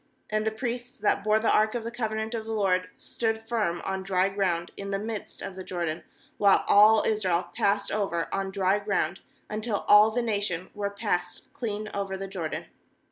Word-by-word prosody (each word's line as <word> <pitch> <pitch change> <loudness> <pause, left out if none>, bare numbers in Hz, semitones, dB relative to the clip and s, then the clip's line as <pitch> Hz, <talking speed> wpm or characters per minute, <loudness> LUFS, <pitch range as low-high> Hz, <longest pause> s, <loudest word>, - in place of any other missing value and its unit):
17And 215 0 0
the - - +3
priests 245 +3 -4
that 205 -2 +1
bore 215 +1 +4
the 220 +1 +2
ark 215 +2 +3
of 235 - -2
the 230 - -4
covenant 220 -1 -3
of 225 -1 -2
the 225 - -4
LORD 185 -3 +1
stood 225 -1 -3
firm 210 -8 -1
on 190 0 -2
dry 190 0 +1
ground 180 -4 -1
in 200 0 -6
the 195 - 0
midst 215 +1 -6
of 190 - -6
the 185 - -6
Jordan, 170 -3 -3 0.4
while 200 -1 +5
all 215 +1 +7
Israel 185 -5 +1
passed 200 0 +1
over 195 -5 -1
on 195 0 -1
dry 190 +1 +1
ground, 195 -4 -1 0.3
until 215 0 -3
all 210 +1 +8
the 240 +2 -1
nation 200 -5 -2
were 205 -1 -2
passed 180 -4 -3
clean 215 -3 -4
over 195 -1 -2
the 195 0 -5
Jordan. 180 -5 -4
205 Hz, 190 wpm, -27 LUFS, 190-220 Hz, 0.4 s, all